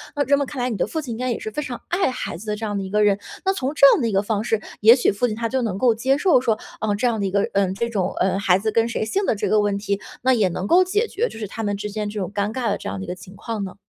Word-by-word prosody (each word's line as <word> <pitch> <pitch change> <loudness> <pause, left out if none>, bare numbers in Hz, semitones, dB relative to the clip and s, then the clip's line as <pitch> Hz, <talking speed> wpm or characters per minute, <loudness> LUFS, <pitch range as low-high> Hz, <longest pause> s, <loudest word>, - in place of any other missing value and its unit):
那 285 -1 +1
这 280 +2 +3
么 280 - -1
看 270 - -6
来 250 +1 0
你 - - -2
的 - - 0
父 320 - -3
亲， 270 -5 -7
应 225 - -4
该 255 0 -1
也 - - -1
是 220 - -6
非 300 - -3
常 255 -5 -5
爱 355 -2 +1
孩 255 - -4
子 195 +6 -10
的 210 - -1
这 220 +1 -5
样 205 -1 -3
的 - - -3
一 190 - -6
个 210 +2 +2
人， 205 -1 +3 0.3
那 385 - +3
从 275 -7 -2
这 280 - +7
样 - - +1
的 230 - +1
一 - - -2
个 195 0 +1
方 210 0 -1
式， 225 -2 0 0.2
也 225 +3 +8
许 250 - +2
父 205 +5 0
亲 215 - -3
他 230 +1 -2
就 260 +2 -1
能 215 -6 -2
够 235 +2 +4
接 260 +5 +1
受 295 -5 +4
说， 225 -4 +1 0.2
嗯， 210 -2 0
这 245 - -1
样 235 -3 +1
的 200 - 0
一 190 - -4
个， 200 0 +2
嗯 195 -1 +1
这 235 +3 -2
种， 200 -5 -1
呃 190 +1 +1
孩 185 -2 +3
子 215 +3 -1
跟 230 +2 +2
谁 225 - -2
姓 385 - -1
的 - - +2
这 205 - -2
个 215 - +3
问 205 -1 +1
题， 200 0 -2 0.2
那 260 +1 +4
也 215 -6 +3
能 180 +2 -4
够 355 - +5
解 415 +5 0
决 460 +3 -1
就 - - -11
是 215 - -4
他 225 +3 -6
们 205 -1 -1
之 210 +1 -4
间 210 0 -3
这 210 0 -5
种 190 0 -3
尴 205 +1 -1
尬 245 -2 -1
的 - - 0
这 - - -6
样 100 - -4
的 95 - -5
一 - - -13
个 - - -3
情 185 +2 -13
况 215 0 -4
呢。 190 - -7
220 Hz, 390 characters per minute, -22 LUFS, 200-255 Hz, 0.3 s, 也